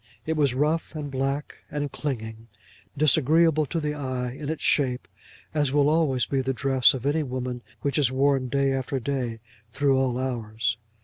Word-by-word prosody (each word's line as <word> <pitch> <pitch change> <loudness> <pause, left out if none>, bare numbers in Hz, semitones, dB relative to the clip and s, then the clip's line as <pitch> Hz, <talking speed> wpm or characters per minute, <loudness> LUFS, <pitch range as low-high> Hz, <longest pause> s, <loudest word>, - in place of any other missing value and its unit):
It 160 - -1
was 140 -5 +2
rough, 155 +4 0
and 145 -2 -5
black, 135 +2 -2
and 145 -1 -3
clinging, 115 -5 -5 0.5
disagreeable 155 +1 +4
to 165 - -2
the 150 -1 -2
eye 130 -4 -3
in 140 +3 -6
its 160 - -3
shape, 125 -8 +1 0.5
as 145 -3 +1
will 145 0 +3
always 150 -6 +2
be 135 -1 0
the 135 +1 -1
dress 135 -1 +4
of 130 0 -6
any 150 +3 +2
woman 125 -3 -4 0.2
which 140 +2 +1
is 135 -4 +3
worn 135 0 +2
day 140 +1 +1
after 135 0 -2
day 125 -3 -3 0.3
through 135 +2 +2
all 130 -2 +1
hours. 115 -3 -2
135 Hz, 175 wpm, -26 LUFS, 125-145 Hz, 0.5 s, disagreeable